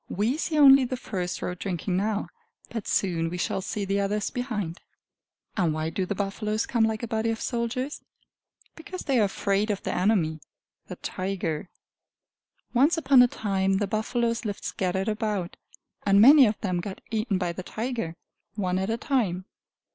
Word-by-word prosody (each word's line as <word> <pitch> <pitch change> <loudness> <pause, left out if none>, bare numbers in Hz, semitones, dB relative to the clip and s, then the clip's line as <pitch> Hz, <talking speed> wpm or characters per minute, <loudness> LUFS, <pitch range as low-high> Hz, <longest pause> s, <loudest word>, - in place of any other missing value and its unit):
We 215 +8 0
see 320 -1 -1
only 275 -2 +8
the 255 0 -2
first 180 -7 -4
row 180 - -2
drinking 180 0 -3
now, 205 +2 -1 0.4
but 225 -4 -5
soon 165 -4 +1
we 180 - -4
shall 180 - -1
see 200 +1 -3
the 195 +1 0
others 200 +1 -1
behind. 210 -9 -3 0.8
And 165 -5 +1
why 155 +1 -2
do 185 +2 -2
the 205 - -2
buffaloes 210 +2 -1
come 230 -3 +2
like 220 +1 -2
a - - -2
body 225 0 0
of 225 0 -2
soldiers? 250 +4 -2 0.7
Because 360 +3 -7
they 265 -4 +2
are 210 - +5
afraid 200 +2 0
of 200 -2 -2
their - - -2
enemy 180 -5 +1 0.5
the - - -6
tiger! 180 -4 -3 1.0
Once 285 +8 +4
upon 275 -5 +6
a 245 - +7
time 195 -4 0
the 205 - +1
buffaloes 230 +3 -1
lived 205 -3 -4
scattered 190 +1 -1
about, 210 -4 -2 0.5
and 200 0 +4
many 270 +3 +9
of 210 - -2
them 180 -3 -1
got 190 +2 -6
eaten 215 -2 0
by 180 -2 -1
the 185 - -6
tiger, 220 -4 -4 0.4
one 185 -3 0
at 190 +2 -2
a 225 - 0
time. 215 - 0
205 Hz, 175 wpm, -26 LUFS, 185-235 Hz, 1.0 s, many